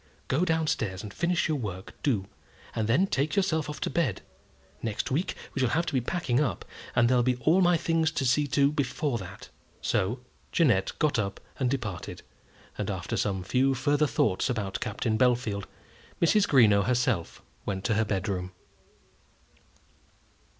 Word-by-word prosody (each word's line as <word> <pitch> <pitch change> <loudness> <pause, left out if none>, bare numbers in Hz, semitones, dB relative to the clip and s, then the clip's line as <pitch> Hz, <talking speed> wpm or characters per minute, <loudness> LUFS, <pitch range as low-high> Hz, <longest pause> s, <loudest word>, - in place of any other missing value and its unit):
"Go 145 +7 +1
down 160 -2 +1
stairs 95 -10 -2
and 105 -2 -8
finish 170 0 +1
your 155 -3 0
work, 95 -5 -6
do; 110 -9 +1 0.5
and 110 -1 0
then 140 +12 +4
take 150 -3 -1
yourself 160 -6 +1
off 150 - -6
to - - -1
bed. 135 - 0 0.6
Next 110 +1 -3
week 165 +8 0 0.2
we - - -3
shall 130 -2 +2
have 170 +7 +1
to 160 - -4
be 130 - +2
packing 130 -2 0
up, 145 -8 -1 0.3
and 120 0 +5
there'll 125 0 +4
be 125 +1 +2
all 160 +9 +3
my 175 -1 +4
things 165 -1 +1
to 135 - -1
see 145 +4 +3
to 140 +1 +3
before 145 -2 -1
that." 95 -3 -10 0.3
So 115 +7 0 0.3
Jeannette 115 - +2
got 150 -6 +1
up 100 -2 -2 0.2
and 130 -2 +1
departed, 120 -9 -4 0.6
and - - -2
after - - -3
some 95 -3 -1
few 130 +6 +2
further 145 +4 +2
thoughts 105 -3 +1
about 105 -6 -2
Captain 110 -3 -1
Bellfield, 120 -5 +1 0.5
Mrs. 205 +5 +4
Greenow 105 -7 +5
herself 125 -7 0 0.2
went 95 -1 -2
to 115 - +1
her 110 +1 +2
bedroom. 95 -3 -2
125 Hz, 165 wpm, -28 LUFS, 105-150 Hz, 0.6 s, and